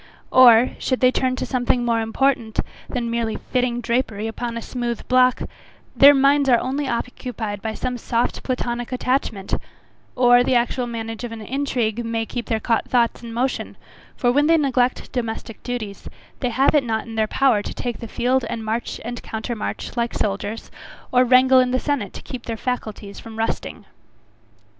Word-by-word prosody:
Or, 245 -1 +7
should 255 - -1
they 255 0 +5
turn 255 0 0
to - - -3
something 245 -1 0
more 230 -1 +1
important 225 0 0 0.3
than 235 -2 -2
merely 230 -1 -1
fitting 245 -1 -1
drapery 230 -3 -1
upon 230 +1 -4
a - - -4
smooth 240 -2 -4
block, 255 0 +4 0.5
their 285 +1 +8
minds 275 +1 +4
are 240 - +6
only 275 +2 -2
occupied 235 -4 -4
by 220 0 -4
some 250 +1 -3
soft 235 +1 -1
platonic 245 -1 -3
attachment; 250 -6 -1 0.6
or, 245 0 +5
the 255 - +1
actual 245 +1 +1
management 225 -1 -5
of 240 - -5
an 225 - -8
intrigue 240 -2 -1
may 230 -1 -2
keep 240 +1 -5
their 225 - +1
thoughts 235 +2 +1
in 235 -1 -8
motion; 250 +3 -2 0.4
for 245 - +2
when 290 +4 +3
they 330 0 +5
neglect 255 -4 0
domestic 225 -2 -4
duties, 225 -5 -5 0.3
they 250 - 0
have 260 +4 +3
it 295 -3 +4
not 220 -2 -2
in 230 - -9
their 220 -1 +1
power 250 -3 +3
to - - -6
take 240 -3 -4
the 230 - -7
field 255 +4 +1
and 225 -1 -4
march 225 +2 -3
and 240 0 -5
counter 220 +2 -4
march 215 - -5
like 235 -1 -1
soldiers, 205 +2 -3 0.4
or 250 0 +5
wrangle 255 +1 +6
in 255 0 +3
the 255 +1 +1
senate 255 -10 -2
to - - -10
keep 250 -2 -8
their 230 -1 -3
faculties 215 -4 -4
from 225 -1 -10
rusting. 225 0 -3
240 Hz, 180 wpm, -22 LUFS, 225-255 Hz, 0.6 s, their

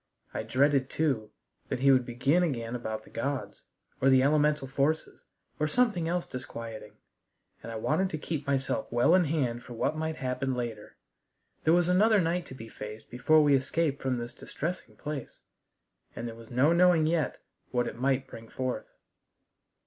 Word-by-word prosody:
I - - -2
dreaded, 135 +4 +2
too, 130 -9 0 0.4
that 125 - -2
he 135 0 +6
would 130 -2 +3
begin 135 +8 +2
again 120 -8 -1
about 110 -2 -4
the - - -18
gods, 140 +3 -4 0.4
or 135 - +5
the 130 -1 +6
elemental 150 -1 +2
forces, 140 +4 -1 0.3
or 150 - +2
something 210 -4 +2
else 175 +1 -1
disquieting, 115 -3 -7 0.7
and 115 - -7
I - - -5
wanted 155 +12 +1
to 155 - -3
keep 150 -2 -4
myself 135 -1 -1
well 120 +7 +4
in 180 -1 +5
hand 130 -6 0
for 125 - -10
what 120 +6 0
might 160 0 -2
happen 130 0 -2
later. 115 -4 -5 0.7
There 160 - +5
was 175 -1 +3
another 205 +4 +5
night 170 0 0
to 130 - -9
be 115 -3 -9
faced 105 0 -9
before 155 +6 +4
we 145 -1 +4
escaped 140 +2 +1
from 130 -2 0
this 120 0 -5
distressing 170 +7 -5
place, 150 -3 -6 0.7
and 120 - -4
there 115 - -6
was 115 0 -13
no 130 +7 +3
knowing 175 -2 +5
yet 160 -3 0 0.3
what 120 -1 0
it - - -5
might 130 +2 +1
bring 115 0 -11
forth. 130 -4 -4
135 Hz, 175 wpm, -29 LUFS, 120-160 Hz, 0.7 s, he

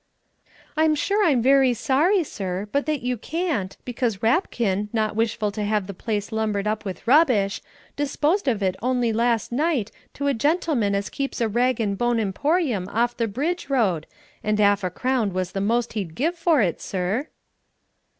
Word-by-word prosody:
"I'm 310 0 +3
sure 405 +7 +1
I'm 275 - +3
very 265 -1 +4
sorry, 330 - +2
sir, 195 - -4
but 285 +1 0
that 300 -5 -1
you 250 0 -1
can't, 310 - -2
because 240 -5 -2
Rapkin, 220 - +1
not 215 -2 0
wishful 220 -1 0
to 210 +1 -4
have 210 -1 0
the 200 - -7
place 205 +3 -3
lumbered 215 -2 -1
up 215 0 -1
with 190 -3 -6
rubbish, 245 -9 +4 0.3
disposed 295 +5 0
of 220 -6 +1
it 185 -1 +1
on'y 245 -1 +1
last 230 0 +1
night 275 -4 0 0.2
to 280 - -3
a 280 - +2
gentleman 270 - +1
as 200 +1 -2
keeps 275 -1 -3
a 230 - +2
rag 245 +3 +1
and 200 -3 -1
bone 240 -1 +2
emporium 230 - 0
off 240 +2 0
the 230 - 0
Bridge 290 - -2
Road, 195 - +1 0.4
and 210 0 0
'alf 205 -1 +3
a 185 - 0
crown 240 0 -1
was 185 -1 -2
the 195 - -3
most 235 +3 0
he'd 190 -7 -4
give 320 +7 0
for 330 -7 +3
it, 175 -4 -1
sir." 195 - -2
230 Hz, 180 wpm, -23 LUFS, 205-280 Hz, 0.4 s, very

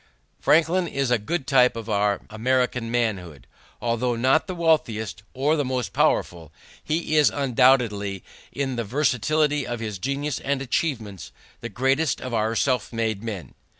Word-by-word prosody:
Franklin 170 +3 +3
is 135 -4 -1
a 120 - +3
good 155 +7 -3
type 125 -3 +4
of 115 -1 -6
our 105 -1 +1
American 125 +1 0
manhood. 95 - -2 0.3
Although 120 +1 0
not 130 - +2
the 185 - -4
wealthiest 115 - 0
or 145 +4 +2
the 145 - 0
most 130 -2 -3
powerful, 85 -3 0 0.3
he 155 0 -1
is 150 - +6
undoubtedly, 120 - +2 0.3
in 135 -3 -3
the 115 - -1
versatility 145 +4 +1
of 120 -1 -4
his 105 -3 -5
genius 140 +4 -2
and 140 0 -1
achievements, 120 - -3 0.3
the 120 - -6
greatest 135 +6 +1
of 130 -1 -6
our 110 0 0
self 130 +1 0
made 110 -3 -2
men. 105 -6 -6
125 Hz, 150 wpm, -24 LUFS, 110-140 Hz, 0.3 s, is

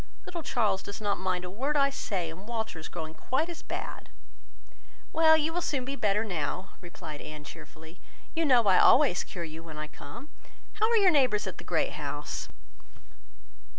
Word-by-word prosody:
Little 345 -2 -5
Charles 210 -10 +1
does 200 - -7
not 205 -3 0
mind 185 -1 -1
a - - -5
word 275 +9 0
I 275 0 +4
say, 190 - -2
and 185 +6 -11
Walter 220 -7 -3
is 160 - -7
growing 160 -2 -6
quite 265 - -1
as 340 - -7
bad." - - -6 1.0
"Well, 315 -1 +7
you 315 +1 0
will 350 - 0
soon 275 -6 -1
be 275 +2 -3
better 210 -3 +2
now," 180 -1 -3
replied 170 -4 -8
Anne, 150 -1 -8
cheerfully. 160 +2 -12 0.3
"You 330 - +1
know 255 -6 +5
I 190 -3 +5
always 265 -9 +6
cure 175 - -6
you 160 0 -7
when 160 -2 -9
I 155 - -3
come. 155 - -10 0.4
How 435 +1 +2
are 465 - +4
your 390 -4 +6
neighbours 250 -9 +3
at - - -6
the - - -7
Great - - +1
House?" - - -4
205 Hz, 185 wpm, -29 LUFS, 165-280 Hz, 1.0 s, Well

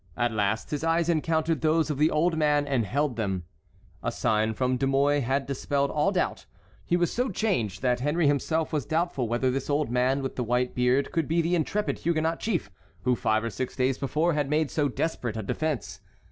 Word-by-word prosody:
At 120 0 +1
last 110 0 -1
his 150 0 -2
eyes 165 +1 +2
encountered 160 0 +1
those 160 0 +2
of 145 - -4
the 155 +1 +4
old 165 +2 +1
man 150 -2 +2
and 130 -6 0
held 140 -1 0
them. 95 -5 -2 0.6
A - - -1
sign 110 0 0
from 130 +1 +1
De 135 - 0
Mouy 140 +2 +3
had 135 +1 0
dispelled 140 +1 -1
all 155 +6 +2
doubt. 185 -3 -1 0.4
He 175 - +1
was 175 -1 0
so 250 +2 0
changed 175 - -1
that 125 -1 +2
Henry 150 +5 +1
himself 155 +3 +1
was 150 -3 0
doubtful 160 -6 0
whether 120 +3 +1
this 135 +3 -3
old 145 -3 0
man 130 +2 +1
with 135 - -4
the 125 - 0
white 125 +2 0
beard 125 +2 +1
could 165 -3 0
be 165 +2 +1
the 170 +1 +1
intrepid 180 +5 0
Huguenot 165 0 0
chief 175 - -2 0.3
who 125 +3 +2
five 110 -1 +1
or 115 - -2
six 125 +5 -4
days 130 0 0
before 155 +5 +1
had 145 -2 -1
made 150 0 +1
so 145 -2 +1
desperate 125 -5 -2
a 110 - -3
defence. 150 +2 -3
145 Hz, 210 wpm, -27 LUFS, 125-160 Hz, 0.6 s, the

